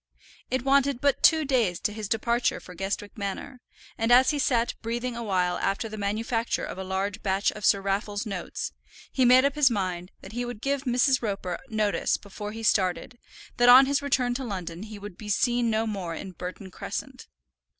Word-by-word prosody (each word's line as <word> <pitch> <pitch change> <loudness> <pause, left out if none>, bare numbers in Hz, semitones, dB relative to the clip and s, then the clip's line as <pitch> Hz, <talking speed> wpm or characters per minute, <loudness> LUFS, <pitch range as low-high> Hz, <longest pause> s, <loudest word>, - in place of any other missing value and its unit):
It 260 -1 -1
wanted 275 -1 +3
but 280 +1 +1
two 315 -2 +5
days 235 -10 +1
to 210 - -1
his 210 -2 -5
departure 235 +2 +1
for 180 - -12
Guestwick 195 +3 -4
Manor, 220 +6 -5 0.4
and 225 +1 +1
as 255 +3 +7
he 295 - -2
sat 240 -4 +1
breathing 235 +2 -3
a 235 - -5
while 180 -5 0
after 195 +3 -1
the 215 - -7
manufacture 225 +3 -1
of - - -7
a - - -3
large 190 +2 -3
batch 195 +1 +1
of 210 - -10
Sir 200 - +4
Raffle's 205 +2 -2
notes, 195 -5 -4 0.4
he 260 - +2
made 255 +2 +7
up 280 - +2
his 295 -3 +4
mind 185 -5 -3
that 190 - -10
he 240 +2 -3
would 240 -3 -6
give 275 +3 -1
Mrs. 255 +1 +3
Roper 195 -5 -3
notice 215 -2 +1
before 205 +1 -8
he 225 +1 -7
started, 200 +4 +1 0.4
that 245 0 +5
on 255 +2 +10
his 280 +1 +1
return 255 -3 +1
to 265 +2 -4
London 180 -6 -5
he 215 0 -8
would 205 -2 -10
be 210 - -7
seen 240 +3 +2
no 220 0 +1
more 190 -6 -4
in 190 - -7
Burton 185 +2 -8
Crescent. - - -6
220 Hz, 200 wpm, -26 LUFS, 195-245 Hz, 0.4 s, on